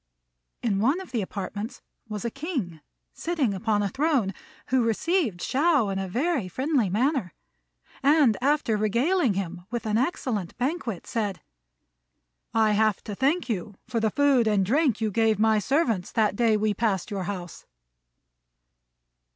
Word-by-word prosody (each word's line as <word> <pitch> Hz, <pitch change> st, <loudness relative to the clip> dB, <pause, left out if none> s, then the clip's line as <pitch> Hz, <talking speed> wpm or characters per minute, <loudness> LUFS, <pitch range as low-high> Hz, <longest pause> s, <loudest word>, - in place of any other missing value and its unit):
In 205 Hz, -5 st, +1 dB
one 270 Hz, -, +2 dB
of 380 Hz, -, -10 dB
the 235 Hz, -4 st, 0 dB
apartments 205 Hz, +3 st, -5 dB, 0.3 s
was 210 Hz, +1 st, -5 dB
a 235 Hz, -, -1 dB
king, 260 Hz, -, -4 dB, 0.3 s
sitting 310 Hz, -11 st, -1 dB
upon 205 Hz, +1 st, 0 dB
a 200 Hz, -, 0 dB
throne, 265 Hz, -7 st, +1 dB, 0.4 s
who 260 Hz, 0 st, +3 dB
received 230 Hz, -, 0 dB
Shao 285 Hz, -5 st, +2 dB
in 195 Hz, 0 st, -2 dB
a 190 Hz, -, -3 dB
very 260 Hz, -, 0 dB
friendly 260 Hz, -, 0 dB
manner; 240 Hz, -, 0 dB, 0.7 s
and, 280 Hz, -5 st, +5 dB
after 280 Hz, -4 st, +2 dB
regaling 235 Hz, -, +2 dB
him 180 Hz, -1 st, -4 dB
with 240 Hz, 0 st, -4 dB
an 215 Hz, +1 st, +1 dB
excellent 240 Hz, -, -2 dB
banquet, 245 Hz, -, -2 dB
said, 210 Hz, -6 st, -3 dB, 1.1 s
"I 220 Hz, -1 st, +3 dB
have 215 Hz, -1 st, +2 dB
to 210 Hz, -, -6 dB
thank 280 Hz, -, +1 dB
you 210 Hz, -3 st, -3 dB
for 230 Hz, -, -1 dB
the 220 Hz, -1 st, +2 dB
food 275 Hz, -2 st, +3 dB
and 205 Hz, -3 st, +2 dB
drink 260 Hz, -, +2 dB
you 215 Hz, -1 st, 0 dB
gave 220 Hz, 0 st, +2 dB
my 220 Hz, 0 st, +3 dB
servants 230 Hz, -, 0 dB
that 215 Hz, -3 st, +2 dB
day 225 Hz, -1 st, +3 dB
we 210 Hz, 0 st, +1 dB
passed 205 Hz, -2 st, -1 dB
your 195 Hz, -3 st, -3 dB
house." 180 Hz, -3 st, -6 dB
225 Hz, 150 wpm, -26 LUFS, 200-275 Hz, 1.1 s, and